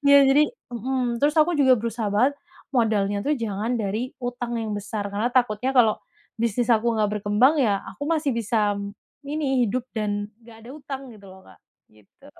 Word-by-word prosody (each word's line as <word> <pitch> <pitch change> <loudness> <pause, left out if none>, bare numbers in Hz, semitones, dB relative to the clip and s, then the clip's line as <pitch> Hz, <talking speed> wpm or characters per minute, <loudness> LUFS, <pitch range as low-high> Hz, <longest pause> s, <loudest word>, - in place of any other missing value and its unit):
ya 280 0 +8
jadi, 285 +3 +5 0.3
mhm, 245 0 -1
terus 295 +2 +3
aku 340 +3 +3
juga 260 -2 +6
berusaha 230 -1 -3
banget 255 +7 +3 0.4
modalnya 205 -4 +1
tuh 295 +1 +2
jangan 220 +2 -2
dari 220 +5 -2
utang 245 -1 -3
yang 215 -2 -3
besar 205 0 -4
karena 220 +5 0
takutnya 245 0 +1
kalau 225 -3 +5 0.4
bisnis 235 +1 0
aku 230 +1 +3
nggak 210 -1 +2
berkembang 245 +10 +3
ya 200 -4 +2 0.2
aku 285 - -6
masih 305 -3 +1
bisa 215 -2 0 0.5
ini 280 -4 0
hidup 250 +4 -2
dan 205 -1 -2
nggak 225 -1 -15
ada - - -10
utang 275 -2 -7
gitu 200 -2 -15
loh, 190 0 -15
Kak, - - -18 0.3
gitu. 105 -2 -22
235 Hz, 175 wpm, -24 LUFS, 210-260 Hz, 0.5 s, ya